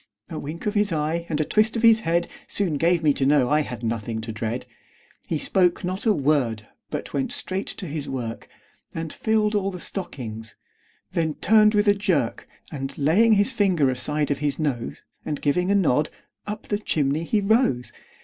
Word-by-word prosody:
A 160 - -4
wink 155 +4 -7
of 210 - 0
his 205 -1 +2
eye, 160 +2 -1
and 155 -2 -1
a 155 - +1
twist 220 +5 +2
of 230 - -3
his 225 -1 +7
head, 170 -4 0 0.2
Soon 180 -7 0
gave 170 +2 +2
me 150 -2 +4
to 135 - -1
know 135 -2 +3
I 150 +1 +4
had 125 -5 -6
nothing 115 0 -2
to 110 0 -5
dread. 110 +2 -3 0.6
He 160 - -1
spoke 180 +3 +1
not 185 +5 -2
a - - +6
word, 135 - +1 0.2
but - - -5
went 135 -2 -1
straight 190 +1 -2
to 195 - -5
his 150 -3 -4
work, 120 -4 -5 0.5
And 165 -1 -4
filled 220 -1 +1
all 200 -2 +1
the 180 -2 -7
stockings; 115 - -6 0.6
then 160 -3 -1
turned 215 +1 +4
with 205 0 +3
a 205 - +7
jerk, 180 - -1 0.2
And 135 -2 -5
laying 185 +11 +4
his 205 +4 +4
finger 185 - +2
aside 150 +4 0
of 145 - -1
his 145 -2 -1
nose, 135 -7 -3 0.2
And 150 - -3
giving 180 +6 +1
a 200 - +3
nod, 155 -6 +2 0.4
up 210 +1 -6
the 205 - 0
chimney 150 -5 0
he 210 +5 +1
rose. 200 - +2
160 Hz, 195 wpm, -24 LUFS, 140-200 Hz, 0.6 s, his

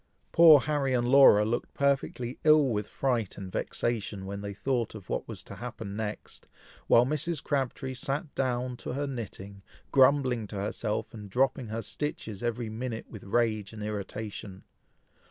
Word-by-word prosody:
Poor 160 -4 +8
Harry 140 -2 0
and 120 -1 +1
Laura 125 -6 +7
looked 120 +2 -2
perfectly 135 -3 0
ill 155 -2 +6
with 105 -3 -1
fright 120 -7 -1
and 95 -2 -7
vexation 105 -4 -2
when 100 +1 -5
they 100 0 -5
thought 120 -1 -1
of 100 -4 -11
what - - -2
was - - -7
to - - -10
happen 110 -4 -6
next, 105 -1 -6 0.4
while 120 - +6
Mrs. 155 +3 -2
Crabtree 135 -1 -2
sat 140 +4 -3
down 125 -1 -1
to - - -5
her 140 +2 -1
knitting, 100 -6 -7 0.3
grumbling 130 -4 +4
to 105 - -8
herself, 105 +3 -2
and 105 -3 -9
dropping 130 +2 +1
her 110 +1 -4
stitches 110 -9 -4
every 120 -1 -2
minute 115 +1 -5
with 110 -4 -10
rage 110 -1 0
and 105 -1 -7
irritation. 105 -1 -6
120 Hz, 160 wpm, -29 LUFS, 105-135 Hz, 0.4 s, Poor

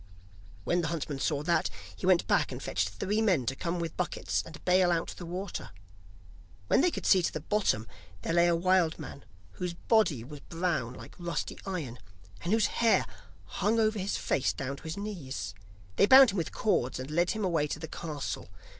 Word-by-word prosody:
When 175 - +1
the 160 - -1
huntsman 155 -4 -3
saw 145 0 0
that, 170 +2 +2 0.3
he 185 - -4
went 185 -2 +5
back - - +2
and - - -5
fetched 90 +2 -1
three 195 - -1
men 185 - +2
to 135 - -1
come 170 +4 -2
with 165 -1 -4
buckets 180 - -1
and 165 0 -12
bale 180 0 +4
out 170 -1 0
the 175 - -8
water. 185 +2 -5 1.0
When - - +5
they 360 - +4
could - - -5
see 190 - +6
to 170 - 0
the - - -4
bottom 150 - 0 0.4
there 165 - -1
lay 170 0 +5
a 170 - +3
wild 180 -1 +2
man 140 - -9 0.3
whose 180 -2 -4
body 175 - +2
was 145 +4 -9
brown 165 -8 -2
like - - -11
rusty 175 -1 -3
iron, 150 -11 -4 0.4
and 175 - -1
whose 220 0 +4 0.2
hair 230 -1 +4 0.4
hung 210 +4 0
over 215 -1 +2
his 195 +2 -1
face 135 - 0
down 135 +1 -4
to - - -15
his 160 +4 -4
knees. 145 - -5 0.4
They 200 - +5
bound 265 -1 +9
him 195 - -4
with 165 - -1
cords, 130 - 0
and 130 +3 -6
led 170 +3 +2
him 215 -2 -1
away 165 -5 +1
to - - -3
the 160 - -6
castle. 150 - -5
170 Hz, 200 wpm, -30 LUFS, 150-190 Hz, 1.0 s, bound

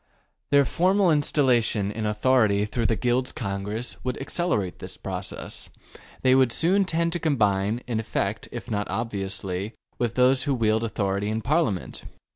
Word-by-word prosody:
Their 140 -1 +5
formal 185 +4 +2
installation 125 -9 +2
in 110 0 -3
authority 105 -2 +2
through 115 +1 -1
the 115 - +1
Guilds 125 +2 0
Congress 105 +2 -4
would 125 0 -3
accelerate 135 - -1
this - - -6
process. - - -4 0.5
They 130 0 +5
would 130 -2 +4
soon 190 +9 +3
tend 170 -1 0
to 175 - -2
combine, 110 -7 +1
in 115 -2 -2
effect 105 -2 -3
if 120 0 -7
not 105 -1 -2
obviously, 100 -2 -3 0.2
with 120 -2 -1
those 130 +2 +4
who 140 -2 +1
wield 110 -1 +1
authority 100 -2 -1
in 110 +1 -2
Parliament. 140 - -1
115 Hz, 150 wpm, -25 LUFS, 105-135 Hz, 0.5 s, Their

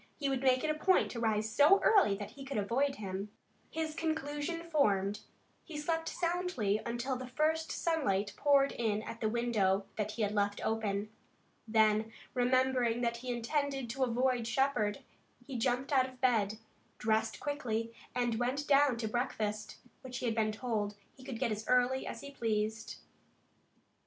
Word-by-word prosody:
He 280 -2 -1
would 265 -2 -1
make 260 -1 +3
it 310 - +2
a - - +1
point 370 +5 +2
to 235 - -5
rise 220 -1 +1
so 290 - +5
early 385 - +5
that 205 +1 -7
he 275 +3 -10
could 270 -2 -4
avoid 260 +7 +1
him. 195 -1 -5 0.4
His 320 -1 -3
conclusion 315 +1 -2
formed, 210 - +1 0.4
he 320 -3 -8
slept 325 +2 -1
soundly 335 - 0
until 240 +3 -2
the 255 0 -6
first 315 +5 0
sunlight 210 - 0
poured 280 -1 +4
in 215 -2 -1
at 230 - -8
the 220 - +1
window 215 -5 +1
that 210 0 -2
he 225 - -1
had 205 - +1
left 205 -1 0
open. 215 -1 -1 0.6
Then, 220 0 +3 0.2
remembering 250 -1 +2
that 235 -1 0
he 250 +1 -4
intended 270 +1 -1
to 265 +2 -1
avoid 250 -1 +1
Shepard, 265 -2 +1 0.4
he 270 - -7
jumped 250 +4 0
out 260 -1 +4
of 255 -1 -17
bed, 220 -5 +2 0.4
dressed 220 0 0
quickly 230 -6 -2 0.2
and 240 -2 0
went 260 +4 -1
down 280 -3 +5
to 225 -1 -2
breakfast, 215 -2 -2 0.2
which 250 -1 -6
he - - -4
had 230 - +1
been 220 -1 +1
told 215 -2 -2 0.2
he 260 - -16
could 260 -3 -5
get 240 -1 0
as 215 0 -3
early 250 +1 +2
as - - -6
he 280 - -8
pleased. 220 -3 -2
245 Hz, 170 wpm, -33 LUFS, 215-275 Hz, 0.6 s, so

